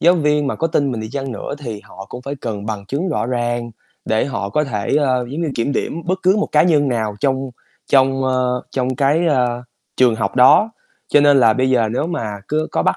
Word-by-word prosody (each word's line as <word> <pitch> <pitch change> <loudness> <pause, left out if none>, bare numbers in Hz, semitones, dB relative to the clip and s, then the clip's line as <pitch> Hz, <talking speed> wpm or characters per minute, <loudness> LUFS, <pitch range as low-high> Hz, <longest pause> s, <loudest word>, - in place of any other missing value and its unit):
giáo 175 +2 +5
viên 150 -3 +1
mà - - -1
có 165 - 0
tin 145 -4 0
mình 115 - -4
đi 110 - -5
chăng 135 -1 -4
nữa 115 - -5
thì 115 -7 -6
họ 95 +1 -11
cũng 125 - -8
phải 140 +2 -5
cần 105 -3 -5
bằng 105 -2 -5
chứng 155 - -2
rõ 150 - -1
ràng 120 -1 -2 0.3
để 110 +2 +1
họ 100 -8 -3
có 150 +8 +1
thể, 110 -2 -2
ơ, 130 -4 +1
giống 160 +4 -3
như, 160 - -1
kiểm 115 +5 -1
điểm 165 +4 -3
bất 185 +1 0
cứ 190 +3 +4
một 210 - 0
cá 150 - +5
nhân 150 -5 +3
nào 110 -4 -1
trong 135 -1 0 0.4
trong, 135 0 +3
ơ, 125 -1 0
trong 130 -1 -2
cái, 145 +5 +2
a, 125 -3 0 0.3
trường 125 -3 +4
học 110 +2 -2
đó. 130 - +6 0.4
Cho 145 - +5
nên 145 -2 +5
là 115 -2 +5
bây 130 +3 0
giờ 115 -4 +2
nếu 145 +6 -1
mà 115 -11 -3 0.2
cứ 155 +1 0
có - - +1
bắt - - +1
130 Hz, 240 wpm, -19 LUFS, 120-145 Hz, 0.4 s, đó